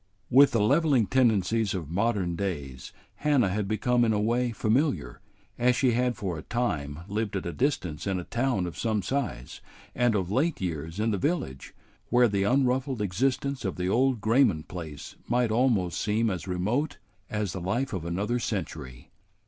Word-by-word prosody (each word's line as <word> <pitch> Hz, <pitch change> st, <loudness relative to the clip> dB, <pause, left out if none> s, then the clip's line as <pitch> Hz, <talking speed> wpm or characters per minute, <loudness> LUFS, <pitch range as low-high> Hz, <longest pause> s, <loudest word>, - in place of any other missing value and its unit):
With 140 Hz, +3 st, +7 dB
the 115 Hz, -, 0 dB
leveling 140 Hz, -1 st, +3 dB
tendencies 110 Hz, -3 st, +2 dB
of 80 Hz, -5 st, -5 dB
modern 100 Hz, -3 st, 0 dB
days 75 Hz, -9 st, -4 dB, 0.3 s
Hannah 140 Hz, -9 st, +2 dB
had 100 Hz, +1 st, -1 dB
become 120 Hz, +4 st, +1 dB
in 110 Hz, -1 st, +2 dB
a 105 Hz, -, +1 dB
way 120 Hz, +3 st, +1 dB
familiar, 115 Hz, -, 0 dB, 0.4 s
as 125 Hz, +1 st, +3 dB
she 130 Hz, -1 st, +3 dB
had 125 Hz, +1 st, 0 dB
for 90 Hz, -5 st, -3 dB
a -, -, -7 dB
time 75 Hz, -12 st, -2 dB
lived 105 Hz, 0 st, -2 dB
at 95 Hz, -, -3 dB
a 85 Hz, -, -3 dB
distance 100 Hz, -, -1 dB
in 95 Hz, -2 st, 0 dB
a -, -, -5 dB
town 120 Hz, -3 st, 0 dB
of 85 Hz, -, -6 dB
some 110 Hz, -4 st, 0 dB
size, 65 Hz, -, -3 dB, 0.3 s
and 120 Hz, -2 st, +2 dB
of 95 Hz, -2 st, -1 dB
late 150 Hz, +8 st, +1 dB
years 80 Hz, 0 st, -4 dB
in 110 Hz, +1 st, +1 dB
the 100 Hz, -, -1 dB
village, 140 Hz, -, -2 dB, 0.3 s
where 125 Hz, 0 st, +5 dB
the 100 Hz, -2 st, 0 dB
unruffled 130 Hz, +3 st, +1 dB
existence 130 Hz, +7 st, -1 dB
of 95 Hz, -, -2 dB
the 90 Hz, 0 st, -2 dB
old 125 Hz, +1 st, +2 dB
Grayman 110 Hz, -, +3 dB
place 80 Hz, -5 st, -8 dB
might 120 Hz, -1 st, +1 dB
almost 110 Hz, -8 st, +1 dB
seem 110 Hz, +1 st, +1 dB
as 90 Hz, -3 st, -5 dB
remote 105 Hz, -, -1 dB, 0.3 s
as 105 Hz, -3 st, -2 dB
the 95 Hz, -, -5 dB
life 120 Hz, +9 st, -1 dB
of 95 Hz, -4 st, -3 dB
another 100 Hz, +8 st, -1 dB
century. 80 Hz, -, -5 dB
110 Hz, 175 wpm, -27 LUFS, 90-125 Hz, 0.4 s, With